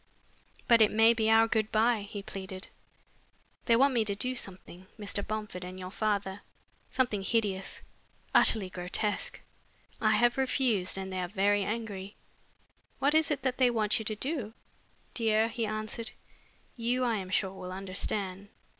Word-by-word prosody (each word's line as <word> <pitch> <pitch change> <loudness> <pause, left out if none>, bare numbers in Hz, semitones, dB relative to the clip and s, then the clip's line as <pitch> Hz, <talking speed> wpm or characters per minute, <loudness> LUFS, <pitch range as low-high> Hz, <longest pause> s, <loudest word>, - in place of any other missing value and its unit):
"But 235 -2 +6
it 215 - +7
may 225 +2 +5
be 220 -1 +1
our 225 0 +6
good 220 -1 0
bye," 225 0 +3
he 205 -2 -6
pleaded. 190 -1 -7 1.0
"They 230 - +5
want 270 +3 +4
me 235 -3 +3
to 200 -1 0
do 255 +5 0
something, 185 -5 -6
Mr. 205 -1 -1
Bomford 210 -4 -5
and 185 +1 -8
your 185 0 -7
father, 200 -2 -1 0.5
something 240 -6 0
hideous, 195 -2 -1 0.5
utterly 210 -4 +4
grotesque. 185 +3 -2 0.6
I 215 -1 +4
have 240 +4 +3
refused 245 -9 +1
and 190 0 -5
they 185 - -2
are 180 - -2
very 200 +1 +2
angry." 205 -3 -4 0.8
"What 280 +2 +2
is 315 0 +4
it 290 -2 -2
that 260 -1 -1
they 255 -1 +5
want 220 0 +2
you 220 - -6
to 215 - -2
do?" 255 -2 -3 0.6
"Dear," 220 -1 +2
he 230 -1 -2
answered, 215 +1 -3 0.7
"you, 245 +2 0
I 235 -3 +1
am 190 -2 -5
sure, 190 0 0
will 185 -1 -7
understand. 195 +1 -3
215 Hz, 160 wpm, -30 LUFS, 195-230 Hz, 1.0 s, it